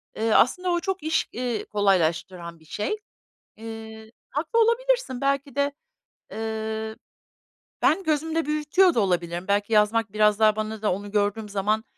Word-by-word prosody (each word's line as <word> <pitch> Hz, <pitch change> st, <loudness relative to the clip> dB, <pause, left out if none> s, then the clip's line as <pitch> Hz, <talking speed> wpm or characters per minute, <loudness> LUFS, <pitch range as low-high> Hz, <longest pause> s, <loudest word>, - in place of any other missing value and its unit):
eee, 225 Hz, +1 st, 0 dB
aslında 360 Hz, +9 st, +3 dB
o 345 Hz, -, +2 dB
çok 380 Hz, 0 st, -3 dB
iş, 315 Hz, +1 st, 0 dB
iii, 240 Hz, -2 st, -3 dB
kolaylaştıran 170 Hz, -3 st, 0 dB
bir 160 Hz, -, -21 dB
şey. 210 Hz, -, -3 dB, 0.6 s
Eee, 220 Hz, 0 st, -9 dB, 0.2 s
haklı 320 Hz, +10 st, -1 dB
olabilirsin. 470 Hz, -, +1 dB
Belki 275 Hz, -1 st, 0 dB
de, 285 Hz, 0 st, +1 dB, 0.6 s
eee, 220 Hz, 0 st, -4 dB, 0.9 s
ben 390 Hz, -, +3 dB
gözümde 320 Hz, 0 st, 0 dB
büyütüyor 305 Hz, +5 st, +3 dB
da -, -, +1 dB
olabilirim. 175 Hz, -3 st, -1 dB
Belki 205 Hz, +2 st, +1 dB
yazmak 215 Hz, 0 st, +2 dB
biraz 210 Hz, 0 st, +3 dB
daha 215 Hz, -1 st, +5 dB
bana 215 Hz, 0 st, -4 dB
da 210 Hz, -, +1 dB
onu 200 Hz, +2 st, -6 dB
gördüğüm 210 Hz, +1 st, 0 dB
zaman, 210 Hz, +2 st, 0 dB
220 Hz, 145 wpm, -25 LUFS, 205-295 Hz, 0.9 s, daha